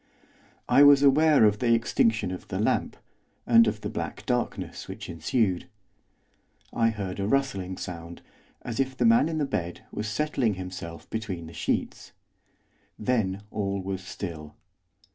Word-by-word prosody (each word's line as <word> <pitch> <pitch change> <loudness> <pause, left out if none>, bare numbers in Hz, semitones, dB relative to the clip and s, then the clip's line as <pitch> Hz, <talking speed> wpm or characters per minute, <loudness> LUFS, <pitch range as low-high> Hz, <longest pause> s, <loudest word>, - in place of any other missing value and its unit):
I - - +5
was 145 -1 +8
aware 145 -2 +6
of 105 0 +3
the 115 -2 +4
extinction 110 -3 +1
of 90 - -7
the - - -4
lamp, - - 0 0.5
and 115 -1 +6
of 105 0 -2
the - - -3
black - - -5
darkness - - -2
which - - -7
ensued. 90 +3 0 1.1
I 115 -1 +3
heard 100 -4 -4
a 100 - -1
rustling 100 -9 0
sound, 85 -1 -8 0.4
as 120 0 -5
if 130 -1 -1
the 120 - +2
man 115 +7 +5
in 160 - -2
the 150 - +1
bed 90 -9 -4
was 105 - -4
settling 125 -3 0
himself 90 -3 -7
between 100 -7 -4
the 80 - -11
sheets. - - -3 0.8
Then 105 -4 -1
all 100 -2 -2
was 95 0 -4
still. 80 -6 -7
105 Hz, 150 wpm, -27 LUFS, 95-125 Hz, 1.1 s, was